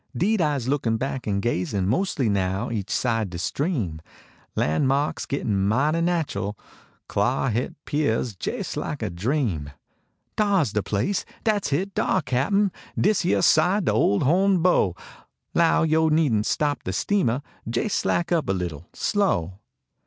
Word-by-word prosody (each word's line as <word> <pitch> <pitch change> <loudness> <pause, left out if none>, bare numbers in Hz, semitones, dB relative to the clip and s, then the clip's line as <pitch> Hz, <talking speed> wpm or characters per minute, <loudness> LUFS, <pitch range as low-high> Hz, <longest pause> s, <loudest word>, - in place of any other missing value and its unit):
Deed 210 - +2
Ise 145 -6 0
lookin 130 -5 +1
back 135 0 -4
en 100 -1 0
ga/.in 100 -3 -1
Mos 185 - 0
ly 130 -5 +1
now 95 +2 0
each 105 -4 -3
side 115 -5 0
de 85 - -6
stream. 110 - -2 0.5
Lan 80 - +1
marks 140 +3 0
gittin 100 -8 0
mighty 145 +10 +2
natch 170 -3 0
l. 105 +1 -3 0.5
Clar 135 - +1
hit 120 +4 -2
pears 125 -6 0
jais - - -4
like - - -4
a - - -2
dream. 95 - -1 0.7
Dar 205 -3 +3
s 135 - -1
de 105 - 0
place! 110 - -1 0.2
Dat 215 -3 +1
s - - -4
hit, 185 +8 -1
dar, 190 -4 +1
cap 130 +5 0
n. 200 -1 +3 0.3
His 205 -2 +2
} - - +1
ere - - +2
side 175 +5 +3
ole 105 -1 +3
ole 100 - +1
ho 175 +8 +3
n 195 -2 +4
bow; 105 - +3 0.6
Low 165 -1 +3
yo 160 0 +3
needn 150 -9 +3
t - - -3
stop 145 -5 0
de 95 - -4
steamah; 140 - 0 0.3
Jais 120 - -1
slack 175 0 0
up 165 - +1
a - - +3
leetle 85 -3 -4
slow. 95 - 0
135 Hz, 175 wpm, -24 LUFS, 105-170 Hz, 0.7 s, n